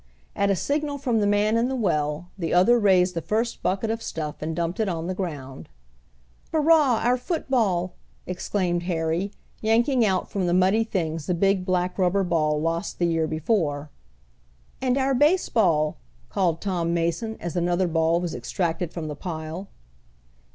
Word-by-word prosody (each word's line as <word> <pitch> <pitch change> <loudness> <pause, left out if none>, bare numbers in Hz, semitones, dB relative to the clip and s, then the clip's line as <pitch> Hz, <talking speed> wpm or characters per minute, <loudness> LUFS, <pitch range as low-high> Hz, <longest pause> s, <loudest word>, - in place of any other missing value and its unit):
At 200 0 +1
a 195 - +3
signal 290 - -1
from 250 -5 0
the 205 - +2
man 205 +2 +2
in 235 +2 +2
the 265 - -2
well 155 - -1
the 175 -3 -2
other 235 +7 +5
raised 185 -3 +4
the 165 - -2
first 225 +6 -1
bucket 195 +5 0
of 225 0 -3
stuff 155 -7 -5
and 160 +1 -3
dumped 170 +4 -2
it 215 -3 +1
on 165 -2 -3
the 185 - -2
ground. 145 -8 -6 0.8
"Hurrah! 305 -6 +4
Our 245 +2 +3
football!" 235 - 0 0.3
exclaimed 180 -1 -1
Harry, 165 +3 -1 0.3
yanking 235 +3 +3
out 190 -4 +1
from 190 -3 -2
the 175 - +2
muddy 190 +5 +3
things 165 -7 -3
the 180 - +1
big 195 +1 +1
black 180 +1 0
rubber 190 +2 +2
ball 155 -4 +1
lost 165 +2 -2
the 175 - +1
year 165 -2 +1
before. 155 -4 -1 0.9
"And 255 0 +1
our 270 0 +2
baseball," 225 - +2 0.3
called 170 -4 0
Tom 175 -4 -1
Mason, 170 +7 -1
as 170 +1 -5
another 175 +1 +1
ball 165 0 +2
was 175 -2 -3
extracted 170 -2 -2
from 165 -3 -5
the 150 - -5
pile. 160 +3 -6
180 Hz, 165 wpm, -25 LUFS, 165-220 Hz, 0.9 s, other